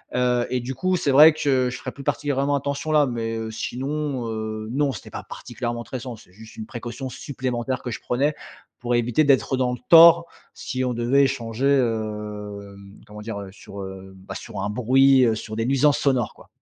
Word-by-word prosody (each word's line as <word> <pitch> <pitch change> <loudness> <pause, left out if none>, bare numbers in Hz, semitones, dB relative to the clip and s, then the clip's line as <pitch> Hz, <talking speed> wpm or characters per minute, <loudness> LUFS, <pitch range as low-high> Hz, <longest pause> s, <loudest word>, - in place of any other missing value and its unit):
Heu, 125 -1 +2
et 125 - 0
du 125 +2 -5
coup 185 +5 0
c'est 145 - 0
vrai 150 +4 +9
que, 130 -4 +1
je 125 - -6
ferais - - -6
plus 140 - -10
particulièrement 145 +1 0
attention 140 +2 -3
là, 150 -1 +4
mais, 115 -3 -3
heu, 110 0 -5
sinon, 135 +2 -3
heu, 110 -1 -4
non, 140 +2 +1
c'était - - -9
pas - - -7
particulièrement 120 -1 -6
tressant 125 0 -6
c'est 90 - -19
juste 110 +3 -14
une 110 - -6
précaution 120 +3 -6
supplémentaire 130 -1 -4
que 125 - -5
je - - -5
prenais, 140 +5 0 0.4
pour 120 0 -1
éviter 120 +5 +2
d'être 135 -1 +3
dans 125 -1 +1
le 125 - -6
tort, 170 0 +9 0.3
si 130 -1 -4
on 125 - -1
devait 120 +4 +3
échanger, 120 -1 -2
hem, 105 -5 -3
comment 105 0 -11
dire, 105 -1 -5
heu? 100 -1 -8
Sur, 100 -1 -10
heu, 95 0 -9
bah, 95 +1 -10
sur 100 - -7
un 100 - -2
bruit, 130 +4 +4
heu, 115 -2 +2
sur 110 0 -7
des 115 +1 -1
nuisances 135 +1 +3
sonores 130 -5 +1
quoi. - - -18
125 Hz, 200 wpm, -23 LUFS, 110-135 Hz, 0.4 s, vrai